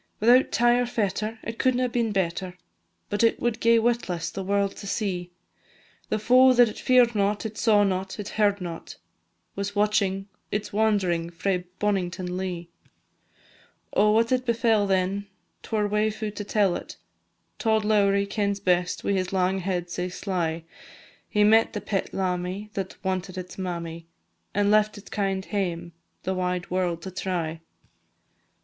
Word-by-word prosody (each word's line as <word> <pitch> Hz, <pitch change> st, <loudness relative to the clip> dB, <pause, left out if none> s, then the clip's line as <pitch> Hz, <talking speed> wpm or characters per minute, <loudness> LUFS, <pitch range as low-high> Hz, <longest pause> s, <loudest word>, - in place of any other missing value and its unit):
Without 245 Hz, +4 st, +5 dB
tie 240 Hz, +1 st, +4 dB
or 245 Hz, -, 0 dB
fetter, 215 Hz, 0 st, -2 dB
it 230 Hz, 0 st, -6 dB
couldna 255 Hz, -1 st, +2 dB
been 235 Hz, -2 st, 0 dB
better, 185 Hz, -1 st, -2 dB, 0.5 s
But 205 Hz, +2 st, +1 dB
it 230 Hz, -, +3 dB
would 240 Hz, -2 st, -1 dB
gae 230 Hz, 0 st, +5 dB
witless 210 Hz, -8 st, 0 dB
the 195 Hz, -, -5 dB
world 200 Hz, +1 st, 0 dB
to 200 Hz, -, -8 dB
see; 185 Hz, -4 st, -2 dB, 0.8 s
The -, -, +1 dB
foe 255 Hz, +4 st, +6 dB
that 245 Hz, -1 st, +6 dB
it 215 Hz, -, -7 dB
fear'd 250 Hz, -2 st, +4 dB
not, 205 Hz, +1 st, 0 dB
it 220 Hz, -1 st, -4 dB
saw 210 Hz, -2 st, +4 dB
not, 190 Hz, +1 st, -2 dB
it 205 Hz, -, -5 dB
heard 205 Hz, -2 st, +2 dB
not, 170 Hz, -2 st, -7 dB, 0.6 s
Was 200 Hz, +1 st, -3 dB
watching 200 Hz, -2 st, +1 dB, 0.2 s
its 210 Hz, 0 st, -3 dB
wand'ring 195 Hz, -6 st, +1 dB
frae 180 Hz, +1 st, -2 dB
Bonnington 185 Hz, -3 st, -1 dB
Lea. 180 Hz, -2 st, -4 dB, 1.3 s
Oh, 210 Hz, +1 st, +4 dB
what 230 Hz, +1 st, +3 dB
then 255 Hz, -, +3 dB
befell 230 Hz, -4 st, +1 dB
it, 190 Hz, +1 st, +1 dB, 0.4 s
't -, -, -13 dB
were 210 Hz, -2 st, +1 dB
waefu' 215 Hz, +1 st, -1 dB
to 205 Hz, -, -5 dB
tell 200 Hz, -3 st, +2 dB
it, -, -, -7 dB, 0.6 s
Tod 220 Hz, -2 st, +2 dB
Lowrie 200 Hz, -2 st, +3 dB
kens 200 Hz, -1 st, -1 dB
best, 180 Hz, -2 st, +1 dB
wi' -, -, 0 dB
his 185 Hz, -2 st, -1 dB
lang 190 Hz, 0 st, +1 dB
head 175 Hz, -2 st, -3 dB
sae 180 Hz, +1 st, -2 dB
sly; 170 Hz, -3 st, -2 dB, 0.7 s
He 210 Hz, -, +3 dB
met 220 Hz, +2 st, +5 dB
the 210 Hz, -, -2 dB
pet 200 Hz, -2 st, -2 dB
lammie, 185 Hz, +2 st, -2 dB
that 190 Hz, -1 st, -4 dB
wanted 185 Hz, 0 st, -2 dB
its 180 Hz, 0 st, -7 dB
mammie, 170 Hz, -2 st, -5 dB, 0.5 s
And 205 Hz, 0 st, +3 dB
left 215 Hz, 0 st, +3 dB
its 205 Hz, -, -13 dB
kind 195 Hz, -2 st, -1 dB
hame 175 Hz, -4 st, -2 dB, 0.3 s
the 190 Hz, -, -1 dB
wide 180 Hz, -1 st, -2 dB
world 180 Hz, -2 st, -1 dB
to 190 Hz, -, -6 dB
try. 170 Hz, -3 st, -3 dB
200 Hz, 160 wpm, -26 LUFS, 180-215 Hz, 1.3 s, foe